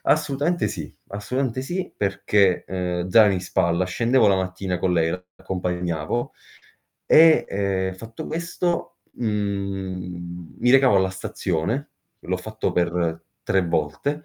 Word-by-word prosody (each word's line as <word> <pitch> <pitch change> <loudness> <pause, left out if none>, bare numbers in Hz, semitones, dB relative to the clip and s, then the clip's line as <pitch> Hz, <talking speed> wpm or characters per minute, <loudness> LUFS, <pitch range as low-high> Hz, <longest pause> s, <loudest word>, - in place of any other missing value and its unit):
Assolutamente 150 0 +1
sì 85 -7 -7
assolutamente 125 +5 -2
sì 175 +6 -4
perché, 100 -1 +2
ehm, 90 -1 -2
zaino 105 -2 +7
in 90 - -2
spalla 85 -1 +1
scendevo 115 +5 +3
la 95 - +4
mattina 95 -1 -2
con 90 0 +1
lei, 80 -1 +2
l'accompagnavo, 90 +1 -3 0.7
e, 160 0 +7
ehm, 95 -1 -1
fatto 115 +4 -8
questo, 170 +1 -2
mhmm, 95 -5 -4
mi 125 - +3
recavo 130 -6 +6
alla 95 0 +2
stazione 95 - -2 0.3
l'ho 95 - -2
fatto 110 +4 -3
per 85 -2 0 0.2
3 95 -1 +2
volte 145 - -1
95 Hz, 120 wpm, -23 LUFS, 90-115 Hz, 0.7 s, zaino